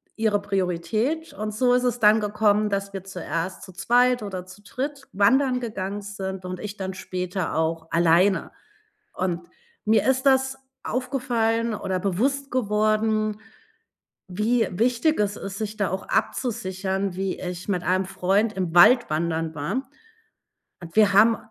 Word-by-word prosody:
ihre 215 -2 +1
Priorität. 205 - -1
Und 215 +1 -4
so 245 +3 +2
ist 250 - +2
es 245 -1 0
dann 215 +1 +5
gekommen, 210 0 +2
dass 200 0 -3
wir 195 -1 -5
zuerst 185 -1 -4
zu 185 - -11
zweit 245 +4 +2
oder 185 -3 -5
zu 185 +2 -14
dritt 275 +5 -5
wandern 250 +6 +3
gegangen 205 -3 -4
sind 190 -2 -6
und 180 0 -5
ich 210 0 -6
dann 190 -1 -4
später 180 -1 -4
auch 160 0 -1
alleine. 170 +4 +3 0.6
Und 175 -2 -3 0.4
mir 215 -1 +4
ist 260 0 +2
das 265 0 +3 0.2
aufgefallen 235 -3 -1
oder 190 -2 -2
bewusst 260 +10 -1
geworden, 215 -2 +1 0.9
wie 220 +6 +1
wichtig 240 - +1
es 205 -1 +1
ist, 195 0 -6
sich 215 -1 -4
da 200 -5 0
auch 190 +1 -4
abzusichern, 195 -5 -1
wie 195 0 -3
ich 180 +1 -6
mit 180 -3 0
einem 185 +1 +1
Freund 195 +4 +1
im 185 -4 -3
Wald 245 +6 +7
wandern 160 0 -1
war. 210 - -3 0.9
Und 170 +1 -11
wir 210 -2 +5
haben 220 +3 +6
205 Hz, 150 wpm, -24 LUFS, 185-230 Hz, 0.9 s, Wald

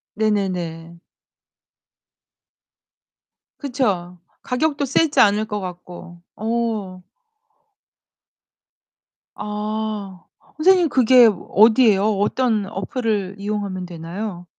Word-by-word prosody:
네네네. 180 -6 -2 2.6
그쵸. 200 - -2 0.2
가격도 285 +2 -1
세지 290 +3 +1
않을 210 +1 +4
것 210 -1 -4
같고. 175 -2 -10
어. 220 -5 -3 2.3
아 210 -3 -5 0.3
선생님 355 +1 +4
그게 250 -2 +6
어디예요? 215 0 +3
어떤 215 0 0
어플을 215 -4 -3
이용하면 200 -2 -4
되나요? 175 +2 -7
210 Hz, 155 characters per minute, -21 LUFS, 185-230 Hz, 2.6 s, 그게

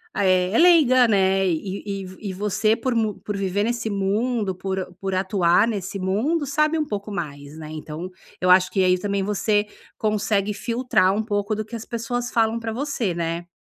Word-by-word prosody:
é 185 -2 +2
é 225 - +1
leiga, 295 -8 +6
né. 195 -2 +3
E 185 +3 -2
e 195 0 -6
e - - -4
você 210 +2 +1
por 245 +1 -1
mu 220 -3 0
por 205 - -5
viver 200 +1 -1
nesse 235 -1 -2
mundo, 205 +1 -1
por 190 -1 -4
por 195 -1 -2
atuar 185 +1 +3
nesse 200 -3 -4
mundo, 245 - 0
sabe 305 +3 +1
um 305 - 0
pouco 205 -2 -5
mais, 145 -4 -6
né. 155 -1 -8
Então 155 +3 -6 0.3
eu 180 - +1
acho 185 0 +5
que 195 - +1
aí 180 0 +4
também 200 +1 -2
você 210 +1 +1 0.3
consegue 210 -1 0
filtrar 230 -3 +1
um 215 +2 -1
pouco 205 0 -1
do 215 - -4
que 225 +3 -8
as 225 - -6
pessoas 240 +1 -3
falam 225 0 +2
para 230 -1 -4
você, 245 -6 -2
né. 170 +1 -3
205 Hz, 190 wpm, -23 LUFS, 185-230 Hz, 0.3 s, leiga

